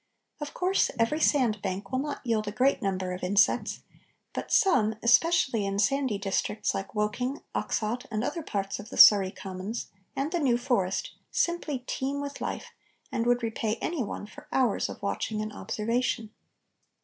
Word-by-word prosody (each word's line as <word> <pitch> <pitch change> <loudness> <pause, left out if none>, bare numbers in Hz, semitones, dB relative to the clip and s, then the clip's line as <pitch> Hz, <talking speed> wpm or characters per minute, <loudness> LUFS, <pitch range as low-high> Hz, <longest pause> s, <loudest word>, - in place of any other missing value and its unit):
Of 295 -1 -6
course 370 +2 +2
every 230 +7 +1
sand 245 -10 +2
bank 195 +1 -4
will 260 - +1
not 285 -1 -4
yield 220 -3 0
a - - -1
great 255 +6 +2
number 185 -2 -1
of 180 - -6
insects, 200 +3 +2 0.5
but - - -5
some, 245 - +4
especially 245 -1 +4
in 195 0 -2
sandy 260 +1 +1
districts 200 +1 -1
like 195 +3 -5
Woking, 225 +6 -1
Oxshott, 230 +3 -2
and 215 -1 -2
other 335 - -2
parts 200 -8 -3
of 205 +2 -9
the - - -8
Surrey 200 -3 +9
commons, 190 +3 -6 0.2
and 280 +3 -1
the 350 - 0
New 255 -6 +3
Forest, 220 -7 0 0.2
simply 310 -7 -1
teem 275 +2 -2
with 285 0 -5
life - - -4 0.4
and 235 -3 -1
would 245 0 +2
repay 225 -1 -1
any 330 -4 -2
one 205 - -5
for 295 +8 -13
hours 255 -6 +1
of - - -7
watching 215 +2 -2
and 215 0 -4
observation. 230 +1 -1
230 Hz, 170 wpm, -28 LUFS, 205-275 Hz, 0.5 s, Surrey